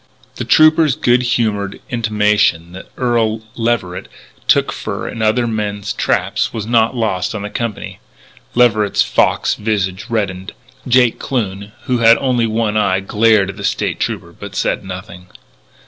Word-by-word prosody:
The -, -, -4 dB
trooper's 155 Hz, -2 st, +5 dB
good 120 Hz, +1 st, +2 dB
humoured 110 Hz, -5 st, -1 dB
intimation 105 Hz, -7 st, +1 dB
that 95 Hz, +1 st, -11 dB
Earl 115 Hz, -3 st, 0 dB
Leverett 115 Hz, -6 st, -2 dB, 0.4 s
took -, -, +3 dB
fur -, -, -5 dB
in 115 Hz, -, -6 dB
other 110 Hz, +3 st, +2 dB
men's 105 Hz, -2 st, -3 dB
traps -, -, 0 dB
was 110 Hz, -3 st, -5 dB
not 115 Hz, +1 st, +2 dB
lost 105 Hz, -5 st, -1 dB
on 105 Hz, -, -4 dB
the 105 Hz, -, -6 dB
company. 115 Hz, -3 st, -5 dB, 0.6 s
Leverett's 110 Hz, -4 st, +3 dB
fox -, -, +1 dB
visage 100 Hz, -2 st, -2 dB
reddened; 95 Hz, -5 st, -3 dB, 0.3 s
Jake 125 Hz, -2 st, +3 dB
Kloon, 100 Hz, -5 st, -3 dB
who 125 Hz, -1 st, 0 dB
had 115 Hz, 0 st, +6 dB
only 125 Hz, -4 st, +1 dB
one 110 Hz, -1 st, 0 dB
eye, 95 Hz, -3 st, +2 dB
glared 105 Hz, 0 st, +2 dB
at 100 Hz, -, -16 dB
the 100 Hz, -, -7 dB
State -, -, -1 dB
Trooper -, -, -3 dB
but -, -, -10 dB
said -, -, -1 dB
nothing. 90 Hz, -1 st, -9 dB
110 Hz, 145 wpm, -17 LUFS, 100-120 Hz, 0.6 s, had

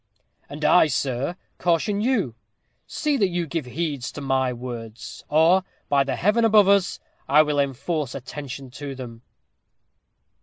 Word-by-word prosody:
"And 150 Hz, +2 st, -5 dB
I, 180 Hz, -, +6 dB
sir, 135 Hz, +2 st, -1 dB, 0.2 s
caution 180 Hz, +4 st, +1 dB
you. 220 Hz, -, +1 dB, 0.5 s
See 300 Hz, -2 st, -1 dB
that 200 Hz, -, +3 dB
you 175 Hz, -1 st, -2 dB
give 160 Hz, -2 st, -3 dB
heed 145 Hz, 0 st, -3 dB
to 140 Hz, +3 st, -6 dB
my 135 Hz, -2 st, 0 dB
words, 120 Hz, -2 st, -8 dB
or, 165 Hz, +5 st, +4 dB, 0.3 s
by 140 Hz, -1 st, +4 dB
the 135 Hz, -, -2 dB
heaven 210 Hz, +5 st, +2 dB
above 215 Hz, -3 st, +6 dB
us! 200 Hz, -1 st, +3 dB, 0.3 s
I 150 Hz, +3 st, +7 dB
will 150 Hz, -1 st, -1 dB
enforce 140 Hz, +1 st, -2 dB
attention 135 Hz, -1 st, -7 dB
to 140 Hz, +1 st, -7 dB
them." 120 Hz, -3 st, -9 dB
145 Hz, 145 wpm, -24 LUFS, 130-180 Hz, 0.5 s, I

